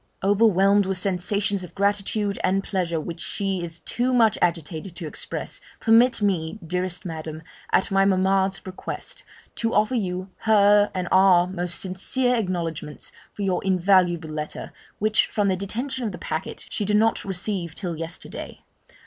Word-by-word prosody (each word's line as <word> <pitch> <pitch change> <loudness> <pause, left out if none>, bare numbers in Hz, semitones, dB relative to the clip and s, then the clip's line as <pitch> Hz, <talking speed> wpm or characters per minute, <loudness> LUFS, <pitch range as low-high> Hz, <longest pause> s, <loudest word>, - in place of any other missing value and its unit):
'Overwhelmed 200 -1 +4
with 190 -1 0
sensations 195 +2 0
of 180 - -11
gratitude 200 0 0
and 195 +1 +2
pleasure, 175 -5 -1
which 165 +2 -6
she 195 -3 -2
is 170 0 -7
too 250 +2 0
much 225 -4 +5
agitated 170 +1 -1
to 175 - -6
express, 150 - -5 0.2
permit 230 0 +4
me, 175 -3 0
dearest 180 +1 -2
Madam, 160 -1 -6 0.3
at - - +2
my 195 0 +4
mamma's 190 0 +2
request, 185 -1 -6 0.4
to 230 0 0
offer 215 +4 +3
you 185 -4 -2
hers 205 -1 +5
and 180 -1 -2
our 185 -2 +6
most 180 -1 -2
sincere 220 +7 0
acknowledgements 170 -8 -3 0.2
for 205 - -5
your 185 -2 0
invaluable 180 -3 +3
letter, 155 0 -5 0.3
which, 215 +1 +2
from 205 -2 0
the 190 - +2
detention 240 +7 -3
of 220 - -1
the 180 - -7
packet, 160 +3 -5
she - - -2
did 210 +1 +2
not 225 +1 +2
receive 190 -3 -3
till 175 -4 -3
yesterday. 165 +1 -7
190 Hz, 155 wpm, -24 LUFS, 175-205 Hz, 0.4 s, our